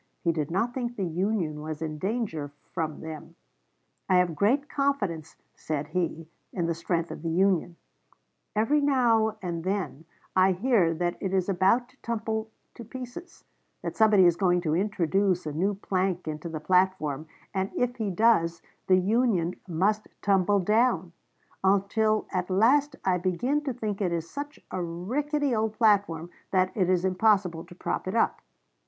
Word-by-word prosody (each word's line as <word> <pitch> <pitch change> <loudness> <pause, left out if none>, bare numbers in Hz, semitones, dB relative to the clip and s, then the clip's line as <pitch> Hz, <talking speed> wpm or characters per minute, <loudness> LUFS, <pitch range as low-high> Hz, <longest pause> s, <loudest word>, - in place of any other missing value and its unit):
He 170 - +3
did 155 -3 -2
not 225 +8 0
think 240 -2 -3
the 195 - -2
Union 175 -3 -1
was 155 0 -5
in 155 -2 -4
danger 190 - -2 0.2
from 160 -4 -3
them. 160 +1 -8 0.7
"I 185 - +4
have 180 -2 +3
great 250 - +2
confidence," 210 - -1 0.2
said 150 -2 -4
he, 165 -3 -2 0.2
"in 175 -3 -2
the 170 - 0
strength 170 0 -2
of - - -7
the 165 - -2
Union. 180 0 +2 0.8
Every 270 +8 +3
now 230 -6 +3
and 170 -2 -3
then 185 -5 -3 0.3
I 185 0 +5
hear 195 -3 +2
that 175 +1 -1
it 190 -1 -2
is 185 -1 +1
about 195 +6 +3
to 275 - -26
tumble 220 -1 -2 0.2
to 235 - -9
pieces; 255 - -9 0.4
that - - -4
somebody 210 -4 +5
is 170 -1 +4
going 180 -2 +2
to 155 -2 0
introduce 190 -1 +1
a 150 - -3
new 195 +6 0
plank 185 -3 -1
into 155 +2 -4
the 160 -1 -4
platform, 160 -4 +1 0.3
and 190 0 -1
if 245 0 0
he 220 -3 -1
does, 170 -5 +2 0.2
the 185 - +5
Union 190 -3 +2
must 200 +5 0 0.2
tumble 200 0 +3
down; 210 -4 +2 0.5
until 200 +3 +2
at 180 0 -2
last 275 +9 +3
I 185 -1 +2
begin 240 +12 0
to 275 - 0
think 215 -4 -4
it 180 -3 +1
is 165 -1 -2
such 285 - -7
a 185 - -2
rickety 265 - -1
old 220 0 0
platform 200 -7 +2 0.2
that 185 -1 +2
it 185 -5 +1
is 185 0 +2
impossible 185 -3 +2
to 175 0 -14
prop 185 - -3
it 185 - -2
up. 230 - +1
190 Hz, 165 wpm, -27 LUFS, 170-220 Hz, 0.8 s, I